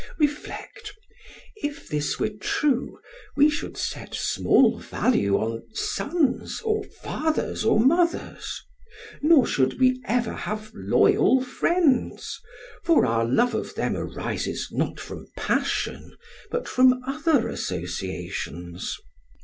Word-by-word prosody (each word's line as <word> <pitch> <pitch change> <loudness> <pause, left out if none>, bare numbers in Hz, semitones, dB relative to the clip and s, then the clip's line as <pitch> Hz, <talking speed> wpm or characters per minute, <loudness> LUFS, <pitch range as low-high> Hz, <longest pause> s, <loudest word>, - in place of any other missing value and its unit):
reflect: 310 +8 -3 0.6
if 290 -8 -5
this 150 -1 -1
were 215 - 0
true, 255 +5 0 0.4
we 290 +1 +6
should 295 - -4
set - - -4
small - - +3
value 100 - +1
on 115 +1 -2
sons, 300 -4 0
or 430 -1 +1
fathers, 315 - -2
or 220 - +4
mothers; 335 +8 +1 0.6
nor 305 -2 +6
should 130 - +1
we 255 0 +3
ever 240 -1 0
have 215 0 -5
loyal 265 - +4
friends, 280 +1 +1 0.4
for 335 -2 +4
our 115 -1 +1
love 135 - +2
of - - -3
them - - -1
arises - - -3
not - - -2
from - - -8
passion, - - -1 0.3
but 480 +1 -2
from 255 0 +5
other 290 -2 +2
associations. 90 -1 -4
255 Hz, 110 wpm, -25 LUFS, -, 0.6 s, we